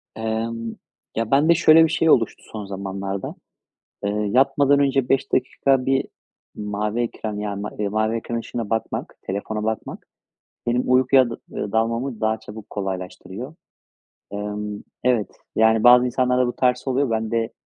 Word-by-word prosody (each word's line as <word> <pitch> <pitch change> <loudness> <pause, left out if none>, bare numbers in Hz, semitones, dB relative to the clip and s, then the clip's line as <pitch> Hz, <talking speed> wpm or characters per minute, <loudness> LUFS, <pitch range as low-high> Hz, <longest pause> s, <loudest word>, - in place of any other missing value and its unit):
Emm, 115 +1 -3 0.4
ya 115 0 -2
bende 150 +5 +5
şöyle 160 0 +7
bir 160 - +3
şey 165 0 +2
oluştu 115 -6 +3
son 105 -2 -6
zamanlarda. 95 0 -5 0.7
Eee, 100 - +1 0.2
yatmadan 140 +2 +4
önce 135 -2 +2
5 135 - +1
dakika 130 0 +1
bir 135 0 +2 0.5
mavi 105 +2 -2
ekran 110 -3 -3
yani 100 -1 -3
ma 105 - -4
eee, 105 -1 0
mavi 110 +2 0
ekran 115 +1 -3
ışığına 115 -1 -5
bakmak, 110 -1 -3
telefona 105 +2 -3
bakmak 110 -1 -4 0.6
benim 120 +1 +2
uykuya 130 0 +4
dı 115 - -6
eee, 100 - -4
dalmamı 115 +2 -1
daha 110 0 +1
çabuk 110 0 -11
kolaylaştırıyor. 95 - -6 0.8
Emm, 105 0 -4 0.2
evet, 120 -5 +2 0.3
yani 110 0 +4
bazı 125 +1 +8
insanlarda 125 0 +2
bu 120 - -3
tersi 125 +1 +1
oluyor. 130 0 +1
Bende, 115 +1 -1
115 Hz, 145 wpm, -22 LUFS, 105-125 Hz, 0.8 s, bazı